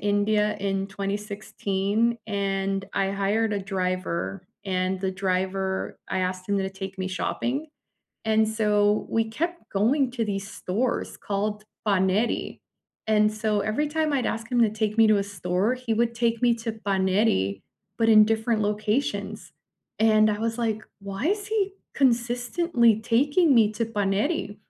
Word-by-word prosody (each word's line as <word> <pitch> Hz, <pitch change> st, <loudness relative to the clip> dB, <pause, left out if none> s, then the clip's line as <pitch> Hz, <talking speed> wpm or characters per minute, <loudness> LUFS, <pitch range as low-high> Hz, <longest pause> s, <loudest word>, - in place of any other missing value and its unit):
India 210 Hz, +1 st, +1 dB
in 195 Hz, 0 st, -1 dB
2016, 200 Hz, +2 st, -1 dB
and 195 Hz, -1 st, -1 dB
I 195 Hz, 0 st, 0 dB
hired 205 Hz, +3 st, 0 dB
a 205 Hz, -, 0 dB
driver, 185 Hz, -1 st, -3 dB, 0.2 s
and 185 Hz, -1 st, -1 dB
the 190 Hz, -1 st, 0 dB
driver 190 Hz, 0 st, -2 dB
I 190 Hz, -, -1 dB
asked 185 Hz, +1 st, -3 dB
him 200 Hz, 0 st, +1 dB
to 190 Hz, 0 st, -2 dB
take 195 Hz, 0 st, -7 dB
me 185 Hz, 0 st, -2 dB
shopping, 245 Hz, -, -2 dB, 0.6 s
and 220 Hz, 0 st, +3 dB
so 210 Hz, -1 st, +2 dB
we 225 Hz, 0 st, +1 dB
kept 340 Hz, +9 st, -4 dB
going 245 Hz, +7 st, +2 dB
to 235 Hz, -3 st, -1 dB
these 200 Hz, -1 st, -4 dB
stores 230 Hz, +7 st, -2 dB
called 210 Hz, +1 st, -2 dB, 0.2 s
Paneri, 200 Hz, +3 st, +1 dB, 0.5 s
and 215 Hz, -1 st, +3 dB
so 215 Hz, -1 st, 0 dB
every 215 Hz, +9 st, 0 dB
time 310 Hz, 0 st, 0 dB
I'd 265 Hz, -3 st, +1 dB
ask 225 Hz, +1 st, -3 dB
him 245 Hz, -1 st, +2 dB
to 220 Hz, -, +3 dB
take 215 Hz, 0 st, -2 dB
me 225 Hz, -, +7 dB
to 215 Hz, -1 st, +4 dB
a -, -, +1 dB
store, 195 Hz, +3 st, -1 dB
he 250 Hz, -3 st, -2 dB
would 235 Hz, +1 st, +1 dB
take 230 Hz, -1 st, 0 dB
me 240 Hz, -1 st, +5 dB
to 230 Hz, 0 st, -4 dB
Paneri, 190 Hz, -, +1 dB, 0.3 s
but 225 Hz, -1 st, +2 dB
in 215 Hz, -1 st, +8 dB
different 220 Hz, +1 st, 0 dB
locations, 210 Hz, +5 st, -2 dB, 0.5 s
and 215 Hz, -1 st, +5 dB
I 210 Hz, -1 st, 0 dB
was 230 Hz, +1 st, -2 dB
like, 220 Hz, -2 st, -1 dB, 0.2 s
"Why 195 Hz, +5 st, -4 dB
is 405 Hz, +1 st, -1 dB
he 410 Hz, -3 st, 0 dB, 0.2 s
consistently 245 Hz, 0 st, +2 dB
taking 285 Hz, +8 st, +3 dB
me 220 Hz, -3 st, +5 dB
to 230 Hz, +2 st, -1 dB
Paneri?" 205 Hz, -, -1 dB
210 Hz, 155 wpm, -25 LUFS, 195-230 Hz, 0.6 s, in